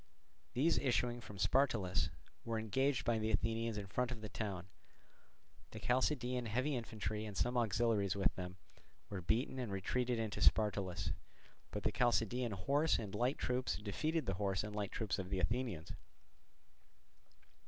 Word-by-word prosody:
These 150 Hz, +7 st, +3 dB
issuing 120 Hz, -2 st, +1 dB
from 105 Hz, -3 st, -9 dB
Spartolus 100 Hz, -2 st, +2 dB, 0.3 s
were 115 Hz, -1 st, -1 dB
engaged 130 Hz, +5 st, +1 dB
by 115 Hz, -1 st, +2 dB
the 110 Hz, 0 st, 0 dB
Athenians 115 Hz, +1 st, 0 dB
in 100 Hz, -, -3 dB
front 125 Hz, +5 st, 0 dB
of 120 Hz, -3 st, -5 dB
the 110 Hz, -, -5 dB
town: 100 Hz, -6 st, -3 dB, 1.0 s
the -, -, -8 dB
Chalcidian 125 Hz, -1 st, +1 dB
heavy 130 Hz, +6 st, +1 dB
infantry, 110 Hz, -2 st, -3 dB
and 105 Hz, -3 st, -5 dB
some 120 Hz, +5 st, +1 dB
auxiliaries 110 Hz, -3 st, +2 dB
with 100 Hz, -, +2 dB
them, 90 Hz, 0 st, -6 dB, 0.5 s
were 95 Hz, -2 st, -3 dB
beaten 120 Hz, +8 st, 0 dB
and 120 Hz, -5 st, -3 dB
retreated 120 Hz, +6 st, 0 dB
into 110 Hz, -2 st, -2 dB
Spartolus; 95 Hz, -5 st, +3 dB, 0.6 s
but -, -, -4 dB
the -, -, +2 dB
Chalcidian 120 Hz, -1 st, +2 dB
horse 140 Hz, +11 st, +2 dB
and 105 Hz, -4 st, -5 dB
light 125 Hz, +6 st, +1 dB
troops 125 Hz, 0 st, 0 dB
defeated 155 Hz, +10 st, -1 dB
the 95 Hz, -, 0 dB
horse 95 Hz, -1 st, +1 dB
and 105 Hz, 0 st, -5 dB
light 105 Hz, -2 st, -2 dB
troops 110 Hz, -3 st, -1 dB
of 95 Hz, -1 st, -4 dB
the 95 Hz, -1 st, 0 dB
Athenians. 95 Hz, -3 st, -1 dB
110 Hz, 155 wpm, -37 LUFS, 100-125 Hz, 1.0 s, These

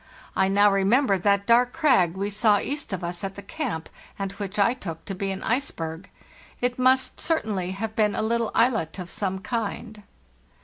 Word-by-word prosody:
I 190 Hz, -, +3 dB
now 205 Hz, +1 st, +4 dB
remember 195 Hz, +2 st, +3 dB
that 200 Hz, +1 st, +2 dB
dark 245 Hz, +2 st, +4 dB
crag 250 Hz, -, +3 dB
we 200 Hz, +2 st, -2 dB
saw 210 Hz, 0 st, +3 dB
east 290 Hz, +4 st, -4 dB
of 190 Hz, -2 st, -3 dB
us 175 Hz, +1 st, -4 dB
at 195 Hz, 0 st, -4 dB
the 200 Hz, -, -9 dB
camp, 245 Hz, -, -4 dB, 0.3 s
and 195 Hz, -1 st, -3 dB
which 200 Hz, 0 st, -6 dB
I 205 Hz, +4 st, +4 dB
took 165 Hz, -10 st, -7 dB
to 195 Hz, -, -4 dB
be 195 Hz, +1 st, -3 dB
an 190 Hz, 0 st, -4 dB
iceberg. 195 Hz, -9 st, -2 dB, 0.5 s
It 245 Hz, 0 st, -1 dB
must 260 Hz, +1 st, +3 dB
certainly 210 Hz, -, -1 dB
have 220 Hz, +2 st, -4 dB
been 210 Hz, -2 st, +2 dB
a -, -, -1 dB
little 230 Hz, 0 st, 0 dB
islet* 225 Hz, -9 st, +2 dB
of 180 Hz, -2 st, -7 dB
some 190 Hz, -2 st, -2 dB
kind. 215 Hz, -1 st, -4 dB
205 Hz, 185 wpm, -25 LUFS, 190-235 Hz, 0.5 s, now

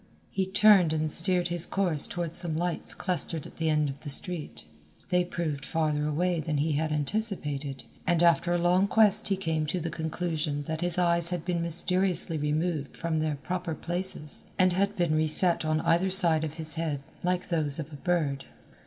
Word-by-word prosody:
He 190 Hz, -1 st, -1 dB
turned 195 Hz, -4 st, +5 dB
and 155 Hz, -1 st, -1 dB
steered 180 Hz, +1 st, +2 dB
his 175 Hz, -1 st, 0 dB
course 175 Hz, -7 st, +1 dB
toward 170 Hz, -2 st, -4 dB
some 170 Hz, -3 st, 0 dB
lights 175 Hz, +1 st, -3 dB
clustered 165 Hz, -3 st, -1 dB
at -, -, -13 dB
the 160 Hz, -1 st, 0 dB
end 150 Hz, -1 st, +1 dB
of 135 Hz, 0 st, -6 dB
the 150 Hz, -, -8 dB
street. 165 Hz, +3 st, -2 dB, 0.4 s
They 180 Hz, -1 st, +2 dB
proved 160 Hz, -5 st, -4 dB
farther 150 Hz, -2 st, -1 dB
away 170 Hz, +3 st, 0 dB
than 155 Hz, -1 st, -2 dB
he 155 Hz, +3 st, 0 dB
had 155 Hz, +1 st, -1 dB
anticipated, 150 Hz, -, -1 dB, 0.2 s
and 175 Hz, -1 st, +2 dB
after 170 Hz, 0 st, +3 dB
a 175 Hz, -, +2 dB
long 180 Hz, +3 st, +2 dB
quest 215 Hz, -1 st, +4 dB
he 195 Hz, -2 st, 0 dB
came 160 Hz, -4 st, -2 dB
to 180 Hz, -, -2 dB
the 165 Hz, 0 st, -4 dB
conclusion 160 Hz, -2 st, -3 dB
that 160 Hz, +2 st, -5 dB
his 175 Hz, -1 st, -1 dB
eyes 170 Hz, -1 st, +2 dB
had 175 Hz, -3 st, -4 dB
been 175 Hz, -2 st, -1 dB
mysteriously 175 Hz, 0 st, +2 dB
removed 150 Hz, 0 st, -2 dB
from 165 Hz, -2 st, -2 dB
their 155 Hz, -1 st, -1 dB
proper 175 Hz, +2 st, -4 dB
places 175 Hz, -3 st, -2 dB
and 185 Hz, -1 st, +3 dB
had 200 Hz, +3 st, 0 dB
been 170 Hz, -3 st, 0 dB
reset 155 Hz, +3 st, +3 dB
on 155 Hz, 0 st, 0 dB
either 175 Hz, +3 st, +2 dB
side 170 Hz, -4 st, +4 dB
of 155 Hz, -1 st, -4 dB
his 160 Hz, -1 st, -5 dB
head 145 Hz, -4 st, -3 dB, 0.2 s
like 180 Hz, 0 st, -1 dB
those 155 Hz, -5 st, 0 dB
of 160 Hz, -1 st, -7 dB
a -, -, -8 dB
bird. 150 Hz, -5 st, -1 dB
165 Hz, 190 wpm, -27 LUFS, 155-180 Hz, 0.4 s, turned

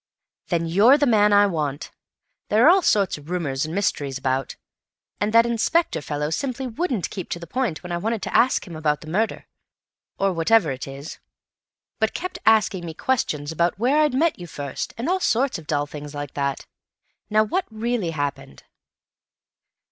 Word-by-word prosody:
"Then 170 Hz, -2 st, 0 dB
you're 205 Hz, -, +5 dB
the 290 Hz, -, +2 dB
man 210 Hz, -4 st, +4 dB
I 205 Hz, 0 st, +6 dB
want. 150 Hz, -6 st, -3 dB, 0.6 s
There 220 Hz, +3 st, +4 dB
are -, -, +9 dB
all 380 Hz, +1 st, +4 dB
sorts 200 Hz, -, +2 dB
of 145 Hz, +2 st, -15 dB
rumours 155 Hz, -5 st, -1 dB
and 160 Hz, -, -5 dB
mysteries 145 Hz, -9 st, -1 dB
about, 135 Hz, 0 st, -2 dB, 0.6 s
and 205 Hz, +1 st, 0 dB
that 230 Hz, +1 st, +6 dB
inspector 235 Hz, -, +1 dB
fellow 150 Hz, +1 st, -3 dB
simply 265 Hz, +8 st, -2 dB
wouldn't 255 Hz, -, -2 dB
keep 185 Hz, -4 st, -6 dB
to -, -, -3 dB
the 170 Hz, -, -8 dB
point 220 Hz, -3 st, -2 dB
when 180 Hz, -, -7 dB
I 175 Hz, -, -1 dB
wanted 220 Hz, +4 st, -2 dB
to -, -, -4 dB
ask 255 Hz, -, +3 dB
him 175 Hz, -4 st, -9 dB
about 150 Hz, -1 st, 0 dB
the 155 Hz, -, -10 dB
murder, 220 Hz, +5 st, -1 dB, 0.7 s
or 195 Hz, -1 st, +1 dB
whatever 165 Hz, 0 st, +3 dB
it 130 Hz, +1 st, -6 dB
is, 140 Hz, +3 st, -8 dB, 0.8 s
but 220 Hz, 0 st, 0 dB
kept 365 Hz, +1 st, -5 dB
asking 210 Hz, -4 st, +4 dB
me 165 Hz, -2 st, -7 dB
questions 155 Hz, -, -1 dB
about 170 Hz, +2 st, 0 dB
where 255 Hz, +8 st, +2 dB
I'd 300 Hz, -4 st, +2 dB
met 320 Hz, -, +1 dB
you 175 Hz, -, -8 dB
first, 140 Hz, -3 st, -5 dB
and 235 Hz, +5 st, -3 dB
all 370 Hz, +2 st, +1 dB
sorts 255 Hz, -, +1 dB
of 155 Hz, -, -15 dB
dull 145 Hz, -1 st, 0 dB
things 145 Hz, 0 st, -9 dB
like 145 Hz, -1 st, -6 dB
that. 140 Hz, -2 st, -2 dB, 0.6 s
Now, 215 Hz, 0 st, +4 dB
what 360 Hz, -, -1 dB
really 220 Hz, -4 st, -2 dB
happened?" 140 Hz, -, -4 dB
185 Hz, 185 wpm, -23 LUFS, 150-230 Hz, 0.8 s, are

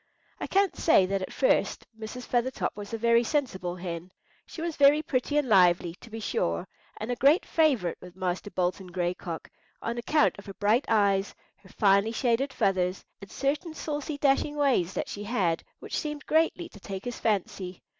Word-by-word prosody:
I -, -, -4 dB
can't 390 Hz, -1 st, +2 dB
say 255 Hz, -, +4 dB
that 195 Hz, +1 st, -1 dB
at 185 Hz, -, -5 dB
first -, -, +1 dB
Mrs. 225 Hz, +3 st, -7 dB
Feathertop 250 Hz, +2 st, -1 dB
was 205 Hz, -1 st, -8 dB
a 225 Hz, -, -2 dB
very 235 Hz, +1 st, +4 dB
sensible 210 Hz, -, -1 dB
hen. 175 Hz, 0 st, -6 dB, 0.4 s
She -, -, -10 dB
was 330 Hz, -1 st, -3 dB
very 290 Hz, +2 st, +5 dB
pretty 275 Hz, +2 st, 0 dB
and 295 Hz, -3 st, +2 dB
lively, 180 Hz, -4 st, +4 dB
to -, -, -12 dB
be 225 Hz, 0 st, -6 dB
sure, 85 Hz, -, -1 dB, 0.3 s
and 215 Hz, +3 st, -4 dB
a -, -, 0 dB
great 285 Hz, -, +4 dB
favourite 270 Hz, -, +1 dB
with 180 Hz, -1 st, -12 dB
Master 185 Hz, +1 st, -3 dB
Bolton 185 Hz, 0 st, -2 dB
Gray 175 Hz, 0 st, -1 dB
Cock, 170 Hz, -2 st, -7 dB, 0.3 s
on 235 Hz, +1 st, -3 dB
account 300 Hz, -1 st, +2 dB
of 200 Hz, -, -13 dB
her 195 Hz, -, -8 dB
bright 215 Hz, +6 st, +2 dB
eyes, 200 Hz, -3 st, +2 dB, 0.2 s
her 190 Hz, -, -19 dB
finely 200 Hz, +1 st, +3 dB
shaded 245 Hz, +3 st, +1 dB
feathers, 185 Hz, -4 st, 0 dB, 0.2 s
and 200 Hz, -, -10 dB
certain 300 Hz, +4 st, -2 dB
saucy 295 Hz, -1 st, -4 dB
dashing 285 Hz, +1 st, +2 dB
ways 260 Hz, -, +2 dB
that -, -, -2 dB
she 205 Hz, 0 st, -6 dB
had 190 Hz, -8 st, 0 dB
which -, -, -4 dB
seemed 300 Hz, -2 st, -5 dB
greatly 325 Hz, +2 st, +1 dB
to 205 Hz, -, -14 dB
take 190 Hz, +1 st, -7 dB
his 245 Hz, -1 st, -5 dB
fancy. 190 Hz, -4 st, -2 dB
220 Hz, 185 wpm, -28 LUFS, 185-280 Hz, 0.4 s, very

